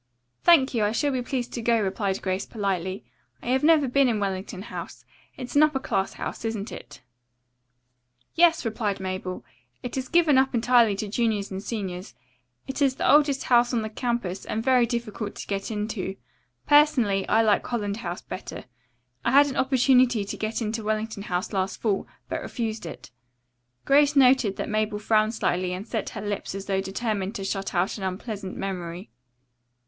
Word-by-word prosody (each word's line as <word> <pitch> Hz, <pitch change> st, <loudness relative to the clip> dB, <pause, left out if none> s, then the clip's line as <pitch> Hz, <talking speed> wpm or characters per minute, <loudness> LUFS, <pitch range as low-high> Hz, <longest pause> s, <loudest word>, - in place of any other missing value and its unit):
"Thank 305 Hz, -7 st, +5 dB
you, 225 Hz, -3 st, +1 dB
I 210 Hz, +1 st, +1 dB
shall 285 Hz, +5 st, +1 dB
be 255 Hz, -2 st, -1 dB
pleased 245 Hz, 0 st, -3 dB
to 235 Hz, -, -3 dB
go," 230 Hz, 0 st, +2 dB
replied 195 Hz, -1 st, -1 dB
Grace 185 Hz, 0 st, -2 dB
politely. 190 Hz, -3 st, -3 dB, 0.4 s
"I -, -, -4 dB
have 260 Hz, +2 st, +2 dB
never 305 Hz, -3 st, +5 dB
been 275 Hz, +2 st, +3 dB
in 220 Hz, -3 st, 0 dB
Wellington 190 Hz, -1 st, -3 dB
House. -, -, -8 dB, 0.3 s
It -, -, -6 dB
is 250 Hz, -, -8 dB
an 290 Hz, -, +6 dB
upper 305 Hz, -2 st, +4 dB
class 195 Hz, -6 st, -1 dB
house, -, -, -6 dB
isn't 225 Hz, -2 st, -3 dB
it?" -, -, -11 dB, 1.3 s
"Yes," 335 Hz, -3 st, +4 dB
replied 215 Hz, -3 st, -1 dB
Mabel. 185 Hz, -1 st, -5 dB, 0.4 s
"It 245 Hz, -, -5 dB
is 260 Hz, -1 st, -3 dB
given 325 Hz, -6 st, +4 dB
up 265 Hz, -1 st, +1 dB
entirely 235 Hz, -2 st, +4 dB
to 210 Hz, +2 st, -4 dB
juniors 210 Hz, -2 st, -1 dB
and 190 Hz, 0 st, -4 dB
seniors. 195 Hz, -4 st, -5 dB, 0.5 s
It 265 Hz, +3 st, -4 dB
is 270 Hz, -2 st, +3 dB
the -, -, -1 dB
oldest 285 Hz, -2 st, +4 dB
house 240 Hz, 0 st, +3 dB
on 225 Hz, -, 0 dB
the 215 Hz, -, -5 dB
campus, 235 Hz, -6 st, -2 dB
and 220 Hz, -, -3 dB
very 250 Hz, -2 st, +4 dB
difficult 225 Hz, -3 st, -4 dB
to -, -, -7 dB
get 195 Hz, -1 st, -3 dB
into. 210 Hz, -3 st, -3 dB, 0.5 s
Personally, 270 Hz, -10 st, +4 dB
I 225 Hz, -, +4 dB
like 210 Hz, -2 st, +3 dB
Holland 205 Hz, -4 st, -2 dB
House 175 Hz, -5 st, -5 dB
better. -, -, -7 dB, 0.6 s
I -, -, +1 dB
had 285 Hz, +1 st, +8 dB
an 265 Hz, -, -5 dB
opportunity 255 Hz, -4 st, +3 dB
to 200 Hz, -, -5 dB
get 220 Hz, +2 st, -2 dB
into 220 Hz, +1 st, -3 dB
Wellington 215 Hz, 0 st, -2 dB
House 180 Hz, 0 st, -3 dB
last 190 Hz, 0 st, -1 dB
fall, 205 Hz, -4 st, -1 dB, 0.2 s
but -, -, -3 dB
refused 220 Hz, -6 st, -4 dB
it." -, -, -10 dB, 0.7 s
Grace 290 Hz, +1 st, +4 dB
noted 255 Hz, -6 st, +5 dB
that -, -, -4 dB
Mabel 215 Hz, 0 st, -1 dB
frowned 215 Hz, +1 st, +2 dB
slightly 180 Hz, -3 st, 0 dB
and 190 Hz, +5 st, -6 dB
set 220 Hz, -4 st, -3 dB
her -, -, -4 dB
lips 205 Hz, -2 st, -4 dB
as 195 Hz, 0 st, -6 dB
though 195 Hz, -1 st, 0 dB
determined 200 Hz, +1 st, -3 dB
to 195 Hz, -, -4 dB
shut 195 Hz, 0 st, -3 dB
out 180 Hz, +4 st, 0 dB
an -, -, -6 dB
unpleasant 190 Hz, +1 st, -5 dB
memory. 175 Hz, -7 st, -5 dB
220 Hz, 185 wpm, -25 LUFS, 195-250 Hz, 1.3 s, had